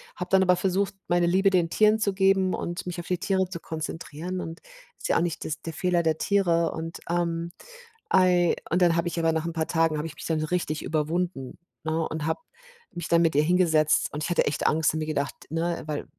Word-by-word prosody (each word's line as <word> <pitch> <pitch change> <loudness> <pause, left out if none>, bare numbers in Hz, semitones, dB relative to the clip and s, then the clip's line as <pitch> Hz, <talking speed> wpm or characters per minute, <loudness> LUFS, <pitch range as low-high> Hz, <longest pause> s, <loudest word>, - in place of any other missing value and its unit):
habe 180 - -5
dann 190 - +5
aber 180 -1 +4
versucht, 195 +2 0
meine 175 0 +2
Liebe 195 +3 +3
den 175 -3 +2
Tieren 215 +4 +4
zu 200 -2 +1
geben 190 -1 +3
und 175 0 -4
mich 175 0 -4
auf 175 - -7
die 180 -1 -1
Tiere 190 0 +1
zu 170 -2 -6
konzentrieren, 160 +3 -5
und 165 +1 -7 0.4
ist - - -5
ja - - +3
auch - - +2
nicht 170 -2 -2
das 155 0 -4
der 165 - -6
Fehler 175 0 +1
der 160 -1 +1
Tiere 170 -5 +2
und, 165 +1 -6
ähm, 170 0 -1 0.6
ei 180 -2 +4
und 180 +2 +1
dann 170 -2 +4
habe 170 +1 0
ich 170 - -4
aber 165 0 +2
nach 160 0 -1
'n 170 - -3
paar 160 -1 -1
Tagen 165 -2 +1
habe 150 +2 -3
ich 160 - -10
mich - - -9
dann 160 -1 0
so 155 - -1
richtig 165 -3 -2
überwunden, 155 -2 -2 0.3
ne, 160 +1 -1
und 155 -1 -4
habe 160 - -1 0.5
mich 170 -1 -6
dann 170 0 +4
mit 165 -3 +2
ihr 150 - +4
hingesetzt 160 -3 +3
und 150 +1 -3
ich - - -2
hatte 175 - +2
echt 145 - 0
Angst 155 -1 +2
und 155 - -2
mir 155 - -2
gedacht, 145 -3 -2
ne, 165 +2 -2
weil 150 -1 -3
170 Hz, 235 wpm, -26 LUFS, 160-180 Hz, 0.6 s, dann